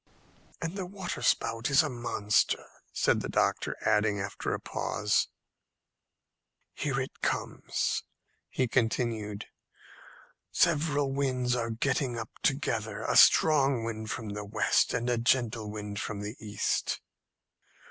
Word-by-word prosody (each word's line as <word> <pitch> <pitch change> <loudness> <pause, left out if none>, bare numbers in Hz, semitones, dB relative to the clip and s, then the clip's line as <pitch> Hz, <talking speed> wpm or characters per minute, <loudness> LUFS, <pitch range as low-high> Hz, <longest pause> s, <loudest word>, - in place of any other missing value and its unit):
"And 165 +3 -4
the 190 -3 -4
waterspout 175 - -1
is 140 +2 +6
a - - -1
monster," 120 -4 +1 0.3
said - - +2
the - - -4
doctor, - - 0
adding, 105 -1 +2
after 100 +1 -3
a - - -1
pause, 105 0 0 1.5
"Here 135 -2 -1
it 130 - -5
comes." - - -1 0.5
He 130 - 0
continued, 115 -3 -1 1.1
"Several 145 -3 +2
winds 130 -3 0
are 115 -2 -1
getting 125 +2 0
up 110 -1 -5
together - - -1
a - - 0
strong 140 -6 +6
wind 110 -1 -4
from 110 -2 -4
the 105 0 -4
west, 105 0 +2
and 120 -1 -1
a 120 -1 +1
gentle 115 -3 +1
wind 105 -1 -5
from 100 -1 -4
the 105 +3 -5
east." 105 -1 -1
115 Hz, 125 wpm, -29 LUFS, 105-135 Hz, 1.5 s, is